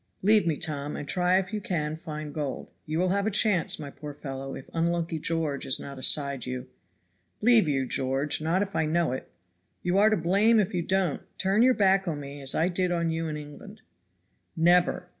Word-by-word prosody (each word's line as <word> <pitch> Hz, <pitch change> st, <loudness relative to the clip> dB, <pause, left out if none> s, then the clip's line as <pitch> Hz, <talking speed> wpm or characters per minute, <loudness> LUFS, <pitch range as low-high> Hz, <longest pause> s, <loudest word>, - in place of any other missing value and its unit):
Leave 210 Hz, -2 st, +4 dB
me, 155 Hz, -3 st, +1 dB
Tom, 145 Hz, -1 st, -3 dB
and 145 Hz, -, -6 dB
try 180 Hz, +3 st, +2 dB
if 190 Hz, +3 st, -2 dB
you 210 Hz, -, -2 dB
can 155 Hz, -5 st, -2 dB
find 155 Hz, -2 st, -7 dB
gold; 145 Hz, -4 st, -4 dB, 0.2 s
you 155 Hz, +1 st, -2 dB
will 180 Hz, +2 st, +2 dB
have 200 Hz, +2 st, +1 dB
a -, -, +3 dB
chance, 205 Hz, -4 st, +2 dB
my 145 Hz, -2 st, -7 dB
poor 145 Hz, -1 st, -9 dB
fellow, 135 Hz, -1 st, -6 dB
if 130 Hz, -, -10 dB
unlucky 165 Hz, 0 st, -1 dB
George 155 Hz, -3 st, -1 dB
is 130 Hz, -, 0 dB
not 140 Hz, -1 st, -8 dB
aside 140 Hz, -1 st, 0 dB
you." 125 Hz, 0 st, -5 dB, 0.7 s
"Leave 230 Hz, -5 st, +5 dB
you, 135 Hz, -3 st, +1 dB
George! 135 Hz, +4 st, -1 dB
not 170 Hz, +5 st, +1 dB
if 195 Hz, -, -8 dB
I 160 Hz, -, +1 dB
know 165 Hz, -2 st, +1 dB
it." 130 Hz, -, -5 dB, 0.5 s
"You 180 Hz, +2 st, +2 dB
are 215 Hz, +1 st, +6 dB
to 215 Hz, -, +2 dB
blame 200 Hz, +7 st, +3 dB
if 200 Hz, -, 0 dB
you 180 Hz, -, 0 dB
don't. 185 Hz, -3 st, 0 dB, 0.2 s
Turn 195 Hz, +3 st, +2 dB
your 255 Hz, +1 st, +5 dB
back 195 Hz, -2 st, +3 dB
on 155 Hz, -3 st, -2 dB
me 140 Hz, 0 st, -8 dB
as 135 Hz, 0 st, -1 dB
I 165 Hz, -, +2 dB
did 180 Hz, 0 st, 0 dB
on 170 Hz, -1 st, 0 dB
you 165 Hz, 0 st, -2 dB
in 155 Hz, -1 st, -4 dB
England." 150 Hz, -1 st, -11 dB, 0.8 s
"Never! 175 Hz, +1 st, +3 dB
165 Hz, 210 wpm, -27 LUFS, 145-185 Hz, 0.8 s, are